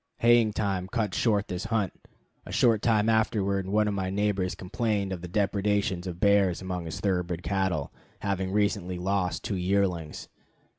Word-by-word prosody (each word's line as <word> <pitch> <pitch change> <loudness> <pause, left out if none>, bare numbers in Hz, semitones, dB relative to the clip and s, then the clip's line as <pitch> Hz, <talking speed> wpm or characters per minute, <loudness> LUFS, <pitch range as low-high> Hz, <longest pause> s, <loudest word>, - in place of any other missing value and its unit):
Haying 115 -2 +5
time 95 -4 -1
cut 105 -1 -1
short 105 -3 +1
this 90 +2 -4
hunt. 110 -4 0 0.5
A - - -10
short 115 -3 +3
time 110 -2 +2
afterward 100 -4 +1
one 105 +2 +2
of 105 - 0
my 95 -2 -2
neighbors 100 -2 0
complained 100 0 -1
of 90 - -6
the 90 - -6
depredations 100 -1 0
of 90 -1 -6
bears 100 -3 +3
among 90 -2 -4
his 80 - -5
thoroughbred 90 -3 -1
cattle, 95 -7 -1 0.3
having 95 -1 -1
recently 100 -3 0
lost 90 0 -1
two 105 -4 -2
yearlings. 90 -4 -1
100 Hz, 160 wpm, -27 LUFS, 90-105 Hz, 0.5 s, Haying